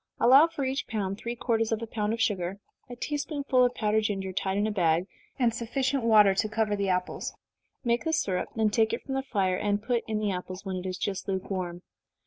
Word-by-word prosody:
Allow 270 +6 +7
for 295 -5 -4
each 265 +2 -2
pound 200 -3 -2
three 235 +1 -4
quarters 225 -2 0
of 225 - +1
a - - -2
pound 215 -1 -2
of 230 - -2
sugar, 195 -3 0 0.3
a 245 - -7
tea 295 +4 -3
spoonful 280 -3 +1
of 250 0 +2
powdered 215 0 +2
ginger, 195 -2 -2
tied 190 +1 -1
in 205 - +2
a 215 - 0
bag, 170 -3 +2 0.3
and 240 -3 +2
sufficient 260 +3 -1
water 210 -3 +6
to 215 +3 0
cover 220 -1 0
the 200 -1 -1
apples. 180 0 -2 0.5
Make 235 -1 +1
the 320 - 0
syrup, 190 - 0
then 220 -2 +2
take 220 +1 +2
it - - -3
from 270 - -5
the 270 - 0
fire, 195 -8 0
and 205 +1 0
put 240 -1 0
in 220 -1 -1
the 210 -1 0
apples, 185 +1 -6
when 190 -1 -3
it 180 +1 -4
is 185 0 -3
just 190 0 -3
lukewarm. 185 -2 -3
215 Hz, 230 wpm, -28 LUFS, 190-240 Hz, 0.5 s, Allow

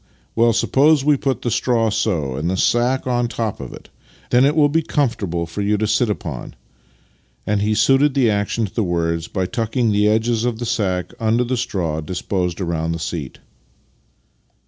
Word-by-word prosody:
— - - -38
Well, 115 +1 +4
suppose 135 +5 +3
we 150 -1 +5
put 135 -1 -2
the 120 - -1
straw 115 -3 +1
so, 90 - -1
and 75 +5 -2
the 95 - -1
sack 120 +6 +1
on 120 -1 0
the 120 - -6
top 110 -3 -2
of 65 -3 -7
it. - - -12 0.4
Then 125 +2 +5
it 145 +2 +2
will 150 -2 +5
be 160 +3 +1
comfortable 110 - -1
to 105 +5 -1
sit 115 +2 +1
upon," 80 -11 -5 0.4
— - - -38
and 105 -1 0
he 105 +1 +1
suited 135 +4 +3
the 130 -4 +3
action 105 +2 0
to 95 - -9
the 115 - 0
words 85 -2 -1
by 95 -2 -2
tucking 115 +3 -1
the 105 0 +2
edges 110 +1 +1
of 120 -2 -1
the 120 - -4
sack 95 -5 -1
under 115 +2 +2
the 125 +1 -1
straw 85 -9 -2
disposed 90 +2 -3
around 85 -2 -2
the - - -3
seat. 80 -4 -5
110 Hz, 190 wpm, -20 LUFS, 90-120 Hz, 0.4 s, we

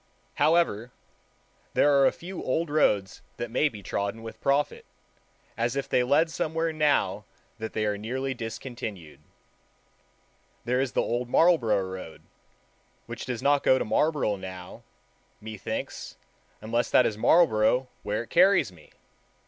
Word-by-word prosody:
However, 150 -8 +2 0.9
there 145 - +4
are 135 - +6
a - - +3
few 180 +2 -8
old 155 +4 -1
roads 105 -11 +1 0.2
that 120 -1 -5
may 145 +5 +2
be 105 -6 -11
trodden 100 +4 -3
with 115 - -9
profit, 140 +1 0 0.7
as 120 +2 -1
if 140 - -2
they - - +2
led 145 +6 +2
somewhere 160 +1 -1
now 140 -10 +1 0.4
that 110 0 -5
they 110 - -1
are 105 -1 -1
nearly 130 +5 -3
discontinued. 115 - -7 1.5
There 125 +2 +1
is 135 -2 -2
the - - +2
Old 120 +1 -2
Marlborough 120 - +3
Road, 95 -3 -9 0.8
which - - -7
does 125 -3 -4
not 145 0 +3
go 130 - +4
to - - -2
Marlborough 145 -4 +1
now, 95 -1 -9 0.6
methinks, 110 -2 -6 0.4
unless 115 +2 -1
that 125 - +5
is 110 - 0
Marlborough 125 -2 +3
where 105 +2 -2
it - - -19
carries 185 - +4
me. 80 -4 -18
120 Hz, 140 wpm, -27 LUFS, 105-145 Hz, 1.5 s, are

